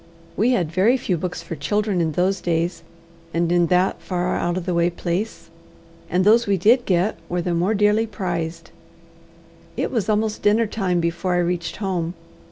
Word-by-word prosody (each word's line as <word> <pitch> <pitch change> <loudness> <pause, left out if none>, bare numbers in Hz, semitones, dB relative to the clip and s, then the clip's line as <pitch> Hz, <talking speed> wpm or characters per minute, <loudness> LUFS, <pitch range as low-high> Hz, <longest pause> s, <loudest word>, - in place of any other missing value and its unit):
We 225 +4 +2
had 175 -10 0
very 205 +9 +3
few 200 -7 -1
books 180 +2 -4
for 165 - -6
children 205 +5 0
in 160 -2 0
those 185 +3 +1
days 170 0 -1 0.5
and 170 0 +1
in 175 -1 +3
that 180 +1 +1
far 180 -1 -1
out 175 +1 -1
of 180 - -4
the 180 - -1
way 170 0 +2
place, 175 +2 -4 0.6
and 180 +2 +1
those 230 +2 +5
we 200 -1 +2
did 235 +7 +3
get 185 +3 +1
were 175 0 -1
the 175 - -1
more 180 +6 +1
dearly 210 +2 +3
prized. 175 -5 -4 1.1
It - - -1
was 225 -5 -1
almost 215 0 0
dinner 215 +3 +3
time 190 -5 -1
before 170 +2 -1
I 175 0 +2
reached 175 -1 -2
home. 180 -4 -2
180 Hz, 180 wpm, -22 LUFS, 170-210 Hz, 1.1 s, those